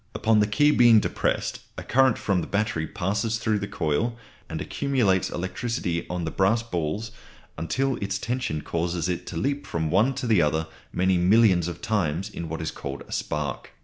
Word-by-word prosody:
Upon 110 -1 +3
the 105 - +3
key 145 +8 +4
being 120 -5 +7
depressed, - - -1 0.2
a - - -5
current 130 -2 +3
from 95 -3 0
the - - -5
battery 100 -6 -1
passes 105 +4 -1
through 110 -2 0
the 100 - -4
coil 105 +11 -1 0.3
and - - -4
accumulates 120 -10 +1
electricity 95 -2 -3
on 90 -1 -2
the 80 - -3
brass 110 +5 +2
balls 100 +2 -3 0.4
until 130 - -1
its 100 -1 -2
tension 120 -12 -2
causes 85 0 -1
it 90 -1 -3
to 85 - -5
leap 140 +8 -1
from 80 -2 -2
one 110 +9 +3
to 135 0 -3
the 110 -6 +4
other 80 +1 +1 0.3
many 95 0 +2
millions 95 -2 +4
of 85 -1 -7
times 95 -2 -1
in 85 -4 -6
what 80 +1 -4
is 80 - -2
called 70 0 -6
a - - -15
spark. 75 -1 -3
100 Hz, 185 wpm, -25 LUFS, 85-115 Hz, 0.4 s, being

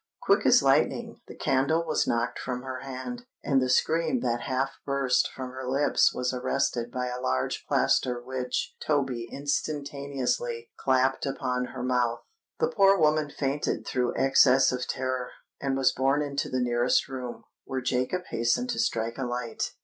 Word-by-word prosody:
Quick - - +3
as - - +6
lightning, - - +1
the - - -10
candle 150 +5 +1
was 155 - 0
knocked 120 +1 0
from 125 -1 -4
her 130 -1 -5
hand, 140 - -7 0.2
and 135 -2 +2
the 130 - 0
scream 165 - +2
that 120 0 -1
half 135 +1 -1
burst 140 -2 +1
from 130 -1 -6
her 130 0 -7
lips 140 +2 +3
was 125 0 -2
arrested 120 -1 -1
by 125 0 -2
a 125 0 -4
large 65 0 -1
plaster 125 -1 +2
which 125 0 -3
Toby 135 -6 -1
instantaneously 145 - -2
clapped 130 +1 +1
upon 125 -2 -1
her 125 0 -7
mouth. 125 -2 +1 0.4
The 470 - +2
poor 195 -1 +5
woman 155 -2 +2
fainted 140 0 -2
through 125 -1 -1
excess 135 0 +5
of 125 0 -3
terror, 130 -1 -2 0.3
and 135 -1 -1
was 135 -1 +4
borne 135 +3 +1
into 140 -1 -2
the 130 - -1
nearest 120 0 +2
room, 130 -3 -6 0.2
where 130 -1 -3
Jacob 130 +8 -1
hastened 120 - +1
to - - -3
strike 115 +2 -1
a - - -1
light. 120 -1 -3
130 Hz, 165 wpm, -27 LUFS, 125-140 Hz, 0.4 s, as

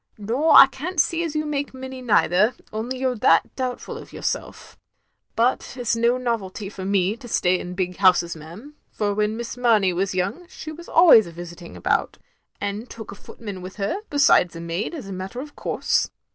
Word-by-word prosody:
"Nor 240 +10 +2
I - - +12
can't 310 +6 -5
see 335 +3 +2
as 320 -2 -4
you 305 0 0
make 285 -2 -3
many 260 0 -7
neither, 210 -2 +3 0.2
only 235 +4 -3
you 260 0 0
're 250 - -3
that 165 -5 +3
doubtful 255 -2 -4
of - - -13
yourself. - - -5 0.6
But 240 +3 +2
't 255 - -9
is 235 -1 +1
no 235 +2 +2
novelty 220 -5 -3
for 195 -2 -8
me 195 +1 +1
to 245 - -11
stay 180 -5 +2
in 180 0 -7
big 180 -1 -2
houses, 180 -3 +3
ma'am, 170 - -11 0.2
for 205 -1 -1
when 210 +1 0
Miss 235 0 -5
Mamey 220 -7 +3
was 190 +2 -1
yoimg, 200 - -3
she 310 - -8
was 340 +2 -11
always 310 - +7
a - - -9
visiting 175 0 -10
about, - - 0 0.4
and 205 +4 -4
took 220 -2 -9
a - - -7
footman 200 -1 -9
with 185 +1 -9
her 200 - -2
besides 275 - +4
a - - -6
maid, 170 - -3
as 270 -11 -7
a 195 - -6
matter 190 +6 -6
of 290 +2 -8
course. - - 0
220 Hz, 200 wpm, -23 LUFS, 185-260 Hz, 0.6 s, I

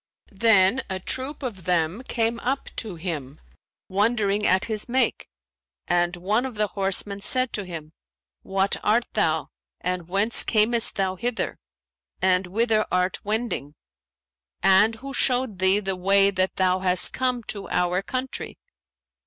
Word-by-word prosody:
Then 205 +2 +4
a 190 0 -2
troop 260 +9 -4
of 200 -9 -5
them 175 +3 +1
came 230 -2 -1
up 265 +4 -2
to 215 -6 -4
him, 155 -5 -5 0.5
wondering 205 0 +1
at 190 +2 +3
his 220 0 -2
make, 260 +2 +1 0.6
and 175 0 +1
one 210 +7 0
of 260 -3 -5
the 210 0 +2
horsemen 200 +1 -1
said 255 +3 0
to 205 - -3
him, 160 -3 -8 0.5
'What 195 +1 0
art 235 +3 +3
thou 160 -7 0 0.3
and 180 -1 -3
whence 200 +5 +3
camest 225 +1 +2
thou 190 -1 -1
hither 240 +4 -2 0.6
and 185 0 +2
whither 215 +3 +2
art 180 +1 0
wending; 210 - -2 0.9
and 195 +4 +5
who 275 +4 -8
showed 250 -7 0
thee 190 +2 +4
the 195 -2 -2
way 195 +2 +4
that 185 -1 0
thou 185 0 +2
hast 180 -1 +2
come 255 -2 -1
to 205 -2 -6
our 180 +1 +1
country?' 255 +5 -5
200 Hz, 145 wpm, -24 LUFS, 185-230 Hz, 0.9 s, and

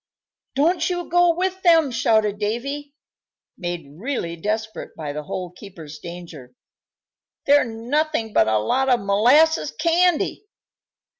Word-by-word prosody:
"Don't 330 +8 +2
you 350 -1 -3
go 350 0 +4
with 375 +1 -2
them!" 330 -6 +4
shouted 220 -3 +1
Davy, 275 +7 -4 0.6
made 175 -3 -5
really 220 -8 -3
desperate 215 +5 -4
by 150 -3 -5
the 150 - -4
Hole 175 +4 -6
keeper's 165 -6 -11
danger. 165 -8 -10 0.9
"They're 285 -1 +5
nothing 235 +1 -2
but 110 - +4
a 110 0 +2
lot 260 - 0
of 245 -2 +4
molasses 250 +12 +3
candy!" 340 +5 +1
230 Hz, 125 wpm, -22 LUFS, -, 0.9 s, They're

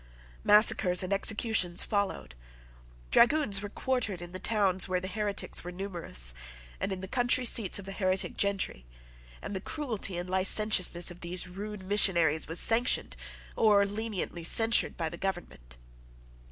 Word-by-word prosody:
Massacres 205 -3 +5
and 185 +2 -3
executions 200 -3 0
followed. 200 - -4 0.8
Dragoons 240 -6 +2
were 205 - -7
quartered 225 -5 -3
in 175 0 -10
the 185 - -6
towns 195 -3 +1
where 185 -1 -1
the 185 - -7
heretics 205 +1 -2
were 175 - -8
numerous, 175 - -5 0.5
and 195 - -3
in 190 -1 -5
the 190 - -6
country 245 +3 0
seats 225 -4 +1
of 200 - -10
the 195 - -8
heretic 190 -1 -2
gentry; 200 - -2 0.6
and 205 - -7
the 190 - -4
cruelty 220 - -5
and 175 +1 -6
licentiousness 185 -2 +4
of 175 - -14
these 175 +1 -5
rude 200 +2 -9
missionaries 170 -6 +3
was 165 +2 +1
sanctioned 235 +2 +2 0.4
or 205 -3 +3
leniently 205 -4 -5
censured 225 +7 +2
by 165 -2 -3
the 170 - -8
government. 170 - -7
195 Hz, 150 wpm, -28 LUFS, 180-210 Hz, 0.8 s, Massacres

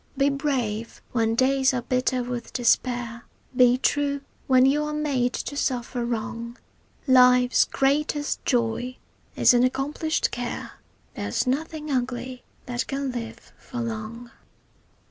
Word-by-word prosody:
Be 275 +1 +3
brave 255 -6 -2
when 225 -2 +1
days 265 +1 +3
are 245 - -2
bitter 255 0 0
with 240 -1 -5
despair, 240 -1 0 0.3
Be 250 0 +5
true 280 +1 0 0.3
when 255 -1 +5
you 290 +3 +3
are 300 0 -3
made 270 -5 0
to 285 - -4
suffer 250 -3 -1
wrong; 235 +1 -4 0.5
Life's 250 -1 +5
greatest 290 +2 0
joy 245 +1 0 0.4
is - - +5
an 240 0 +4
accomplished 290 +5 0
care, 245 0 -4 0.4
There's - - -2
nothing 305 +3 -2
ugly 255 0 -3 0.2
that 245 0 -3
can 275 -1 -2
live 235 -2 -7
for 245 - -7
long. 230 +1 -5
250 Hz, 125 wpm, -25 LUFS, 240-275 Hz, 0.5 s, Be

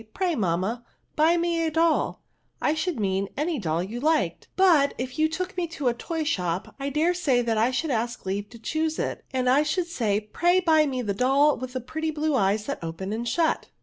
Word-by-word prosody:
Pray, 370 -2 +1
mamma, 195 - -1 0.3
buy 320 +3 +4
me 335 -1 +1
doll, 325 +1 +1 0.4
I 300 - +1
should 320 -3 -2
mean 195 -1 0
any 305 0 -1
doll 165 -3 -1
you 220 +6 -5
liked; 285 - 0
but^ 335 -7 +4
^ 255 +2 -4
you 315 0 +3
took 365 +3 -4
me 355 -2 -1
to 315 -3 -6
the 245 - +3
toy 320 +7 -3
shop, 180 - -2
I 275 +1 -2
dare 310 +5 +2
say 275 -9 +1
that 230 -1 0
I 230 +3 +3
should 275 +4 -1
ask 235 -1 -2
leave 200 +2 -3
to 235 - -12
choose 315 +7 -2
it, - - -3
and 255 -1 -1
I 265 +3 +5
should 320 +4 0
say, 215 -10 -2
Fray 350 +2 +3
buy 315 -4 +4
me 255 -2 -2
the 205 -3 -1
doll 275 +6 +3
with 255 0 -7
the 255 - -3
pretty 315 +6 -3
blue 310 0 -1
eyes 210 -3 +1
that 280 -10 -4
open 165 +5 -4
and 235 +2 -3
shut." 330 -2 +1
275 Hz, 215 wpm, -25 LUFS, 220-320 Hz, 0.4 s, I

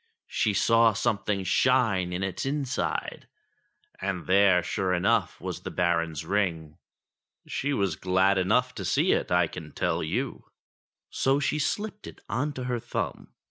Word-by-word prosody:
she 105 - +2
saw 115 +3 +4
something 105 -2 -1
shine 100 -3 +2
in 90 +2 -2
its 95 -2 -3
in 140 +1 -1
side, 125 - -3 0.7
and 95 -2 -3
there, 95 -1 +4
sure 90 +1 0
enough, 90 - +1
was - - -5
the - - -5
Baron's 85 -3 0
ring! 85 -5 -1 0.7
She 145 - -2
was 100 - 0
glad 95 +3 +2
enough 125 +7 +2
to 100 - -6
see 85 - +2
it, - - 0
I 90 -1 +4
can 80 -1 -9
tell - - 0
you; - - -3 0.7
so 135 +1 +2
she 150 +1 0
slipped 210 +7 -3
it - - -11
on 130 +8 -1
to 130 - -5
her 125 -1 -2
thumb. - - -4
100 Hz, 155 wpm, -27 LUFS, 90-125 Hz, 0.7 s, saw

